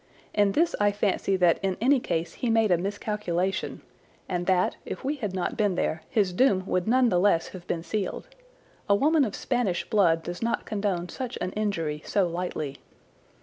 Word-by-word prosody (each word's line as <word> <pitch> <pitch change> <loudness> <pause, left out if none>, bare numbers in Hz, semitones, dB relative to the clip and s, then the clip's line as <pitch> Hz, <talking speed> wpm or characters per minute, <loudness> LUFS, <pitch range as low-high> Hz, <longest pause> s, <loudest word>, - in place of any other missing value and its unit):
In 205 -2 +3
this 335 +7 +2
I 205 0 +4
fancy 200 -1 0
that 175 -2 +3
in 190 -2 -1
any 265 +4 +4
case 165 -7 -2
he 245 - -2
made 225 -3 +3
a 175 - +5
miscalculation, 195 -1 -2 0.4
and 175 -1 -2
that, 185 -1 +2
if - - -6
we 285 +3 -1
had 210 -8 -4
not 185 - -2
been 205 -4 +1
there, 160 -2 -1
his 200 -5 +1
doom 190 -3 +3
would 185 -1 -1
none 250 +1 +4
the 180 -4 +2
less 180 -3 +2
have 180 -2 -11
been 165 - -2
sealed. 195 - -3 0.6
A 200 - +6
woman 300 +6 +3
of 215 -6 -2
Spanish 235 -9 -1
blood 170 -7 +3
does 175 +1 -6
not 230 0 -1
condone 200 -4 -1
such 255 -2 -5
an 185 - -2
injury 165 -8 -2
so 195 -3 +1
lightly. 165 -5 -4
195 Hz, 190 wpm, -27 LUFS, 175-215 Hz, 0.6 s, A